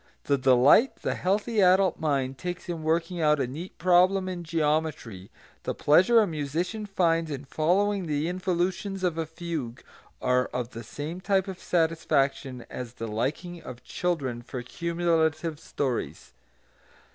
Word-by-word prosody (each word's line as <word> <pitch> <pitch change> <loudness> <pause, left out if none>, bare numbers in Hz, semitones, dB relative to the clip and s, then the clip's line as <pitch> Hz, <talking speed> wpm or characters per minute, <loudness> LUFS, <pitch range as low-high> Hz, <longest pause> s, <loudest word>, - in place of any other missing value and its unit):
The 140 - +2
delight 130 - +5
the - - 0
healthy 210 +4 0
adult 185 0 +4
mind 135 -4 -1
takes 180 0 -5
in 170 -2 -4
working 165 +2 0
out 150 -1 +3
a 135 - +1
neat 155 +9 -8
problem 185 +2 +4
in 180 -2 -4
geometry, 150 - -1 0.3
the - - -3
pleasure 185 +10 +5
a - - +3
musician 170 +6 -3
finds 165 -4 +1
in 140 -1 -5
following 185 +7 +1
the 150 +1 0
involutions 185 +2 -2
of 170 -3 0
a 160 - -2
fugue, 160 -7 -5 0.4
are 125 0 +2
of 125 -1 -4
the 115 +1 -8
same 155 - -6
type 195 0 +1
of 190 -2 -6
satisfaction 140 -6 0
as 120 -2 -7
the 115 -2 -6
liking 150 +11 -3
of 125 -1 -10
children 140 -9 -2
for 125 +1 -6
cumulative 165 0 0
stories. 130 - -3
160 Hz, 145 wpm, -27 LUFS, 135-180 Hz, 0.4 s, delight